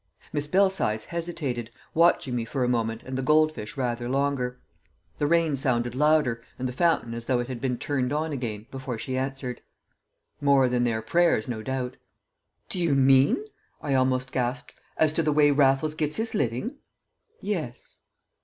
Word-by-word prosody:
Miss 145 -1 -1
Belsize 185 - +2
hesitated, 155 -9 -4 0.2
watching 165 -5 +3
me 120 - -1
for 130 +3 -2
a - - +1
moment 115 -2 -1
and 130 - -6
the 130 - -1
goldfish 150 -5 +1
rather 120 -2 -2
longer. 135 -2 0 0.6
The 145 - +2
rain 165 -2 +3
sounded 120 -3 0
louder, 150 -4 +2 0.2
and 130 - -2
the 125 - -5
fountain 160 -6 +1
as 115 0 -6
though 130 - +2
it 120 - -2
had 125 -2 -6
been 130 -2 -1
turned 130 -2 -1
on 155 +2 -1
again, 110 -5 -4
before 130 -3 -5
she 130 -2 -4
answered: 130 -2 -3 0.8
"More 140 -2 +5
than 125 0 +1
their 110 -2 -1
prayers, 170 -3 +2
no 115 -3 -3
doubt!" 130 +1 -3 0.7
"Do 180 - -3
you 165 -5 +2
mean," 135 - +4 0.3
I 140 - -2
almost 130 0 +1
gasped, 125 +1 -2 0.2
"as 155 -1 +3
to 165 - +1
the 155 -1 +1
way 145 0 +5
Raffles 140 +1 +3
gets 155 -1 -2
his 225 +1 -2
living?" 205 - -1 0.6
"Yes." 165 - -5
135 Hz, 170 wpm, -26 LUFS, 125-150 Hz, 0.8 s, More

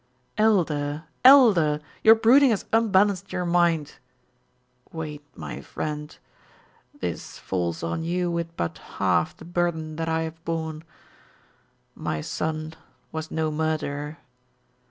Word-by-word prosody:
"Elder 160 -8 +1 0.2
Elder! 210 - +7 0.2
Your 225 0 +9
brooding 255 +5 +6
has 215 -4 0
unbalanced 200 -3 +3
your 180 - -2
mind." 170 -3 +1 0.9
"Wait, 155 -2 -6
my 75 -3 -7
friend. 150 -1 -5 0.8
This - - -5
falls 85 -3 -3
on 85 - -2
you 175 +1 -1
with 170 -1 -4
but 85 - -3 0.2
half - - +1
the - - -12
burden 170 -3 -2
that 165 0 -2
I 160 0 0
have 160 0 -7
borne. 160 -2 -3 1.1
My 80 - -3
son 155 - -3 0.4
was 160 0 -5
no 160 -1 -1
murderer. 150 -1 -2
160 Hz, 115 wpm, -25 LUFS, 150-180 Hz, 1.1 s, Your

